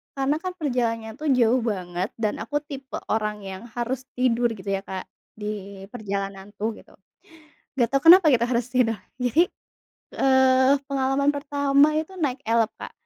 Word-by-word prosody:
karena 275 +2 +1
kan 370 +1 -4
perjalanannya 230 -6 -1
tuh 310 - -3
jauh 245 +1 +4
banget 180 0 -3
dan 215 -2 -2
aku 290 +6 -2
tipe 275 -2 -8 0.2
orang 210 -1 -1
yang 190 -1 -7
harus 250 +2 -3
tidur, 245 -1 +2
gitu 200 -1 -8
ya - - -6
Kak, 190 -1 -5 0.3
di 200 -2 -6
perjalanan 200 -2 -5
tuh, 215 +3 -1
gitu. - - -17 0.8
Enggak 240 -4 +2
tahu 275 0 +1
kenapa 355 0 +9
kita 235 0 +2
harus 240 -1 0
tidur. 230 -4 +1 0.2
Jadi, 255 +8 +3 0.7
eee, 260 0 +5
pengalaman 275 +1 +1
pertama 285 +1 +2
itu 320 +5 -3
naik 275 -5 -1
Elf, 230 -1 +2
Kak. - - -7
245 Hz, 155 wpm, -24 LUFS, 215-275 Hz, 0.8 s, kenapa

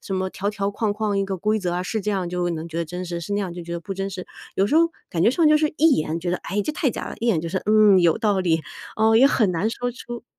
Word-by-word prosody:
什 195 - -4
么 190 0 -1
条 200 +2 -2
条 200 -1 -2
框 205 0 -1
框 210 -1 -1
一 195 - +1
个 195 -1 -3
规 215 +4 0
则 180 -2 -2
啊， 180 +1 -1
是 220 +4 -2
这 210 +1 -2
样 190 -3 -1
就 175 0 -1
能 165 0 -5
觉 165 - -5
得 170 - -1
真 180 +3 -6
实， 170 -1 -4
是 170 +4 -5
那 205 - 0
样 190 -3 -3
就 175 0 -7
觉 170 - -7
得 170 - -2
不 195 +2 -6
真 195 +1 -3
实。 185 -1 -7 0.3
有 195 - +3
时 290 - -1
候 335 +1 +5 0.2
感 165 - -1
觉 225 - +5
上 325 +4 +2
就 305 - +6
是 305 0 +1
一 320 0 +5
眼， 155 +2 -2
觉 175 +1 -3
得， 180 - +1
哎， 205 +1 -3
这 305 - -3
太 295 -3 0
假 - - -5
了， - - -6
一 235 - -1
眼 185 -9 +2
就 165 - -4
是， 185 - -1
嗯， 210 -3 +6
有 170 +3 +3
道 205 -4 +1
理 165 -3 +1 0.4
哦， 220 +1 +3
也 250 - +6
很 220 -9 +2
难 180 +6 0
说 245 +1 -3
出 240 -1 -8
195 Hz, 345 characters per minute, -23 LUFS, 175-220 Hz, 0.4 s, 就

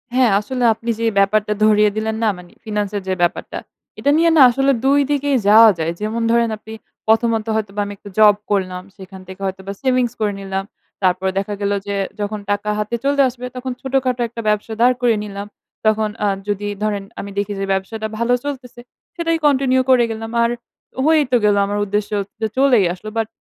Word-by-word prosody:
হ্যাঁ, 255 -4 +4
আসলে 250 +4 -3
আপনি 230 +2 -7
যে 230 - -1
ব্যাপারটা 210 +1 +2
ধরিয়ে 210 -1 +5
দিলেন 220 0 -1
না? 220 - +3
মানে 175 -1 -14
ফিন্যান্স 210 -2 -2
এর - - -3
যে 190 - 0
ব্যাপারটা। 175 - -1 0.4
এটা 285 - +2
নিয়ে 335 +1 +4
না - - +7
আসলে 270 +3 +2
২ 280 +1 +4
দিকেই 285 -1 +1
যাওয়া 225 +1 +9
যায়। 160 +1 -1
যেমন 220 +2 -2
ধরেন 235 -1 +3
আপনি 220 +1 -11 0.3
প্রথমত 225 0 +2
হয়তোবা 210 -1 -2
আমি 205 - -6
একটু 205 - -12
জব 210 -1 +7 0.2
করলাম। 185 -2 -1 0.2
সেখান 190 -1 -11
থেকে 190 +1 -11
হয়তোবা 190 0 -5
savings 255 -3 +1
করে 210 -2 0
নিলাম। 195 0 -3 0.4
তারপর 185 +1 +2
দেখা 200 +1 -2
গেল 200 - 0 0.2
যে, 200 - -2 0.2
যখন 210 +1 -3
টাকা 205 +1 -1
হাতে 210 +3 -2
চলে 280 0 +2
আসবে 250 0 -9
তখন 255 +1 -4
ছোটখাটো 260 -2 0
১ - - -23
টা - - -2
ব্যবসা 210 +1 -1
দাঁড় 250 +1 +5
করে 240 -2 +3
নিলাম। 200 0 -7 0.4
তখন 215 0 +2 0.2
আ - - +3 0.2
যদি 205 0 -2 0.2
ধরেন 205 -2 -1 0.2
আমি 200 - -6
দেখি 205 0 -1
যে 195 - -1
ব্যবসাটা 215 +3 -3
ভালো 235 +2 +1
চলতেছে। 260 -4 -7 0.3
সেটাই 330 -2 0
continue 260 -2 +3
করে 255 -2 +5
গেলাম। 225 0 -6
আর 235 - +2 0.6
হয়েই 310 -1 +4
তো 245 - +5
গেল 205 -1 +4
আমার 205 +1 -2
উদ্দেশ্য 205 +1 -2
হচ্ছে 205 +3 -6
চলেই 255 -8 +4
আসলো। 185 +4 -9
বাট 225 -1 0
215 Hz, 195 wpm, -19 LUFS, 205-250 Hz, 0.6 s, যাওয়া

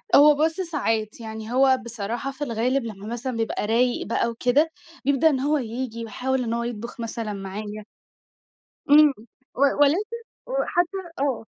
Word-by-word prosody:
هو 295 +1 +8
بُص 320 +2 +1
ساعات، 225 - -1
يعني 220 0 -7
هو 265 0 +5
بصراحة 235 +3 -4
في 275 +2 -6
الغالب 250 +1 0
لمّا 210 -2 -7
مثلًا 240 +2 -4
بيبقى 225 -2 -1
رايِق 240 +2 +2
بقى 235 +1 +1
وكده، 250 +7 +2 0.3
بيبدأ 280 +3 +4
إن 270 -4 0
هو 295 +3 +2
ييجي 235 -2 -4
ويحاول 255 +4 -1
إن 230 - -2
هو 235 0 -1
يطبُخ 235 0 -6
مثلًا 230 -2 -4
معايا. 205 +2 -6 1.0
إمم، 295 0 +7 0.4
و 270 - -4 0.2
ولكن 390 +11 +2 0.3
وحتى 390 -7 0 0.2
آه، 270 -5 -1
245 Hz, 150 wpm, -24 LUFS, 225-280 Hz, 1.0 s, هو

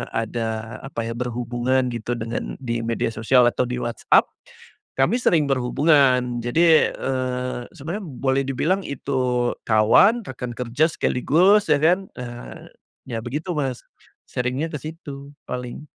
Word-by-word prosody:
ada 115 0 -3
apa, 115 -4 -4
ya, - - -3
berhubungan, 125 +1 -1
gitu, 120 +1 -3
dengan 115 0 -4
di 120 -1 -1
media 115 0 -1
sosial 115 +3 +3
atau 125 - -1
di 125 - -3
WhatsApp, 120 -1 +3 0.7
kami 200 - +2
sering 165 -8 +3
berhubungan. 130 -2 +3
Jadi, 160 +6 +4
eee, 125 -1 -2 0.2
sebenarnya 175 +7 -5
boleh 135 0 0
dibilang 170 +9 0
itu 125 -3 -1 0.2
kawan, 120 - +5
rekan 125 -1 -6
kerja 125 +6 +1
sekaligus, 180 +11 +3
ya, - - +7
kan, 180 +4 +3
ah, 120 -1 -8 0.4
ya, 115 -2 -3
begitu, 150 +9 -4
Mas, 135 -4 -2 0.5
sharing-nya 125 +5 -1
ke 150 - -3
situ 145 -3 -9 0.2
paling. 125 +3 -5
125 Hz, 130 wpm, -23 LUFS, 120-150 Hz, 0.7 s, ya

